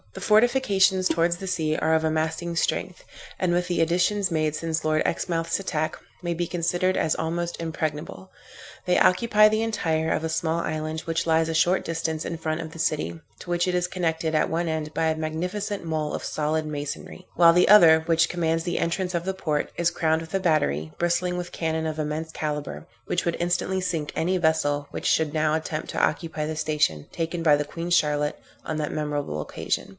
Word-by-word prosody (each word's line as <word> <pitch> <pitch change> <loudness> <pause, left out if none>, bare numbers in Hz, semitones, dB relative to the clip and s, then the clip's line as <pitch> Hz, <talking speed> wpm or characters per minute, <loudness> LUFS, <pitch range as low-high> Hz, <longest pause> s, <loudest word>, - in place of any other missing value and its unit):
The - - -8
fortifications 210 -5 +3
towards 170 0 +1
the 190 - -7
sea 160 -4 0
are 160 - +1
of 160 0 +2
amasing 160 +2 -1
strength, - - -1 0.3
and 180 -2 +1
with 175 0 +1
the 175 - -1
additions 180 +4 +2
made 155 -2 0
since 160 0 -2
Lord 155 0 +2
Exmouth's 165 -1 -1
attack, 155 -5 -2 0.3
may 175 -1 -2
be 170 +1 -2
considered 175 +2 0
as 155 - +1
almost 170 +1 -3
impregnable. 150 - -4 0.6
They 180 0 +3
occupy 215 +2 +5
the 215 +1 +1
entire 160 -8 0
of - - 0
a - - +1
small 160 0 -1
island, 155 -1 -3
which 165 -1 -2
lies 160 0 +3
a 165 - -2
short 175 +4 +2
distance 160 -1 -2
in 170 - -4
front 160 0 -2
of 160 - -6
the 165 - -11
city, 85 - -1 0.2
to - - -11
which 175 +1 +1
it 180 - 0
is 180 0 +1
connected 160 -3 -1
at 155 - +2
one 170 +2 -1
end 155 -1 -3
by 165 - 0
a 160 0 +1
magnificent 180 +6 -3
mole 155 -2 -2
of - - -4
solid 155 +1 -1
masonry, 150 +4 -6
while 170 -1 +7
the 180 +2 +4
other 165 -6 +8
which 165 0 +2
commands 165 -1 -1
the 175 - -1
entrance 180 +2 -1
of 170 -1 -1
the 190 +1 -2
port, 155 -6 -1
is 170 0 +2
crowned 160 -2 +1
with 165 +2 -10
a 195 - +2
battery, 80 - +1
bristling 175 +1 0
with 180 0 -5
cannon 160 -1 -1
of 155 0 -3
immense 155 +1 -3
calibre, 150 -2 -4 0.2
which 175 - -1
would 170 -1 -1
instantly 175 +2 0
sink 165 -5 -2
any 185 +3 +1
vessel 145 -4 +1
which - - -6
should 155 -2 +2
now 155 -1 +1
attempt 155 0 -2
to - - -1
occupy 155 -1 -1
the 155 +1 -3
station 150 - 0
taken 165 +1 -3
by 155 -3 +5
the 145 - 0
Queen 165 +3 -6
Charlotte 150 -3 +2 0.3
on 155 - -3
that 150 -1 -2
memorable 145 - -2
occasion. 75 - -3
165 Hz, 200 wpm, -25 LUFS, 155-175 Hz, 0.6 s, other